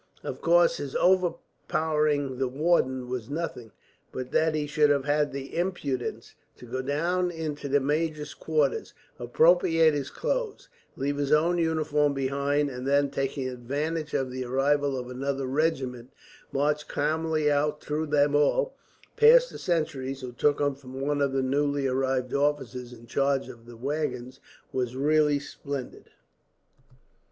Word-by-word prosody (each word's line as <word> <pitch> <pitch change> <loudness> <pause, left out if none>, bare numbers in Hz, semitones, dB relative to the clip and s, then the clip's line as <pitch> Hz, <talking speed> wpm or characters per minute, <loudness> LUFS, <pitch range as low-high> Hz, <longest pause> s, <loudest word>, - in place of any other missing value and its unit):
Of - - -6
course, - - +4
his - - -6
overpowering 155 - 0
the 135 - +1
warder 130 -2 +1
was 125 -2 -5
nothing; 145 -7 -4 0.4
but 130 0 -6
that 160 0 +2
he 150 -1 -1
should 150 0 +3
have 140 -2 +2
had 150 0 +1
the 135 0 -7
impudence 160 -8 -3 0.2
to - - -12
go 130 +2 -3
down 170 +7 0
into 155 -4 -4
the 145 +1 +4
major's 150 +1 -1
quarters, 155 -3 -1 0.2
appropriate 165 +5 +4
his 140 -2 -2
clothes, - - -3 0.3
leave 140 +1 -1
his 145 0 -1
own 165 +3 +3
uniform 155 -3 +1
behind 140 +2 0
him; 125 - -7
and 125 +1 -5
then, 140 0 +2
taking 135 -1 -2
advantage 145 +6 -3
of 130 -1 -1
the 130 0 -4
arrival 135 +2 +1
of 125 0 -6
another 135 +1 -2
regiment, 130 -3 -1 0.4
march 150 +2 0
calmly 155 0 0
out 150 +1 +1
through 155 +1 -3
them 145 0 +3
all, 485 - +2 0.4
pass - - +7
the - - -9
sentries 140 -6 -2
who 125 -1 -6
took 145 +4 +1
him 145 -1 +1
for 135 -1 -17
one 135 +3 -2
of 140 -1 +2
the 135 0 0
newly 140 +1 0
arrived 130 -1 0
officers 135 -4 -1
in 120 -1 -13
charge 135 +2 0
of 120 -2 -13
the 120 -1 -11
waggons 135 -1 -3 0.3
was 125 -1 -2
really 150 +1 +3
splendid! 140 -2 -7
145 Hz, 150 wpm, -27 LUFS, 130-155 Hz, 0.4 s, pass